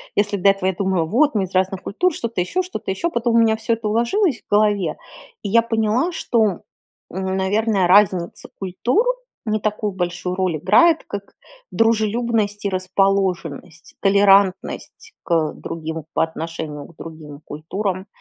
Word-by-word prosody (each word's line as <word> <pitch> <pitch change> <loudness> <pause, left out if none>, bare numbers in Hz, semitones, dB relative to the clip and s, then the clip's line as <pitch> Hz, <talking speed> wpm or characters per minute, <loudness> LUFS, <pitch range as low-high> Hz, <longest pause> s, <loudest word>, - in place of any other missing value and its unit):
Если 205 0 +1
до 195 +1 +4
этого 195 -1 +1
я 190 - -3
думала: 190 -3 0
"Вот 270 - +2
мы 205 - +2
из 185 - -6
разных 190 0 +1
культур", 360 - 0
что-то 230 -8 -3
еще, 335 - -1
что-то 365 - -5
еще. 195 - -1
Потом 235 -5 0
у - - +6
меня 225 -1 +4
всё 220 +1 -1
это 225 -1 -3
уложилось 240 - +1
в - - -48
голове, 205 -5 +2 0.4
и 205 - -4
я 230 +3 +5
поняла, 230 +7 0
что, 220 - 0 0.5
м, 190 +1 -2
наверно, 200 0 +1
разница 185 -2 +3
культур 225 - 0 0.4
не 215 -1 0
такую 210 -1 -2
большую 180 0 -3
роль 185 -4 0
играет, 320 - +4
как 200 0 -7 0.4
дружелюбность 220 -1 0
и - - +2
расположенность. 185 -4 -1
Толерантность 200 - +2
к 165 -3 0
другим 160 -1 -6
по - - +2
отношению 160 -2 -5
к 170 - -19
другим 155 -3 -10
культурам, 185 +5 -4
200 Hz, 155 wpm, -20 LUFS, 180-225 Hz, 0.5 s, у